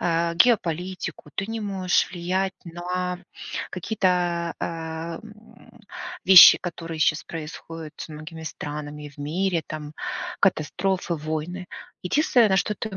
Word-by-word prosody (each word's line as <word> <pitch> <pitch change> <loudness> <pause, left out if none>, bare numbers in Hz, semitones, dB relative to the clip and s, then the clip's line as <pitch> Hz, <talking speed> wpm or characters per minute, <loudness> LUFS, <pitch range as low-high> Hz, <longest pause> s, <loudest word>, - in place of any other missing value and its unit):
э, 170 0 +1
геополитику, 180 -6 +1
ты 195 - -2
не 225 +1 -4
можешь 190 -3 +1
влиять 185 +2 -1
на 180 +1 -3 0.5
какие-то, 180 -3 0
э, - - -2
м, 170 +9 -8 0.4
вещи, 185 -1 +11
которые 165 -2 -6
щас 155 +1 +2
происходят 165 0 -7
со 155 - -7
многими 155 +2 -9
странами, 150 -1 -6
в 140 - -23
мире 170 +3 0
там, 150 -1 -6 0.5
катастрофы, 180 0 +1
войны. 160 +4 -4 0.4
Единственное, 240 - +4
на 190 - +3
что 210 +3 +1
ты 215 -2 -5
175 Hz, 120 wpm, -25 LUFS, 160-190 Hz, 0.5 s, вещи